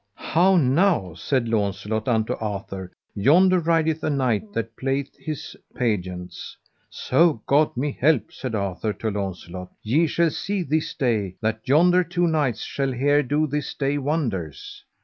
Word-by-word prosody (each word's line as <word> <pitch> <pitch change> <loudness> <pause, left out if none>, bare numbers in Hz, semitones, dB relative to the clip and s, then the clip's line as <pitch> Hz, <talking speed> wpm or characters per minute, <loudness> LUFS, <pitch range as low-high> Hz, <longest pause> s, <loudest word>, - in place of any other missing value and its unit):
How 185 +3 +3
now, 145 - +2
said 120 - -1
Launcelot 105 0 -1
unto 110 -3 +1
Arthur, 95 -3 -5 0.2
yonder 180 - +4
rideth 160 -1 +1
a - - +1
knight 125 -7 0
that 115 0 -3
playeth 135 +1 -2
his 155 -3 -6 0.2
pageants. 90 -7 -3 0.3
So 145 -3 +2
God 145 -1 +2
me 140 +3 0
help, 135 -6 +2
said 125 -4 -4
Arthur 100 +1 -2
to 110 +1 -3
Launcelot, 95 -2 -5
ye 150 +10 +2
shall 170 +1 +1
see 195 +4 -2
this 155 0 -1
day 110 - 0
that 110 0 -1
yonder 175 +6 +5
two 175 0 0
knights 150 -9 0
shall 135 -1 -2
here 145 +3 +3
do 145 +3 +1
this 150 0 -3
day 140 +1 0
wonders. 120 - -3
130 Hz, 150 wpm, -23 LUFS, 105-155 Hz, 0.3 s, yonder